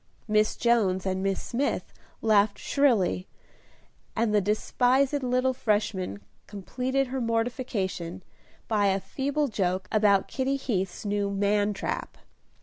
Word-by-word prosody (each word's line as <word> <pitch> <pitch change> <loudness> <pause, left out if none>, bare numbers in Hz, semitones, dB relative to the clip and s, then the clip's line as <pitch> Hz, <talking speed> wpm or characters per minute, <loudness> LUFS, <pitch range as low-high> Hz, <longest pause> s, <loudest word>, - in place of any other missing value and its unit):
Miss 215 0 +2
Jones 205 -6 +2
and 190 0 -1
Miss 195 0 0
Smith 270 +4 -2 0.3
laughed 205 -2 +3
shrilly, 220 -10 +1 0.9
and 225 -1 +1
the 210 - +4
despised 255 +7 +2
little 255 +1 +1
Freshman 205 - -1 0.3
completed 255 +6 -2
her 265 0 -2
mortification, 225 -7 -2 0.4
by 210 -3 +2
a 195 0 +2
feeble 285 +7 -1
joke 185 -4 -1
about 205 -3 +3
Kitty 265 +1 -1
Heath's 195 -9 -3
new 205 0 0
man 205 +1 +1
trap. - - -4
215 Hz, 120 wpm, -27 LUFS, 195-250 Hz, 0.9 s, the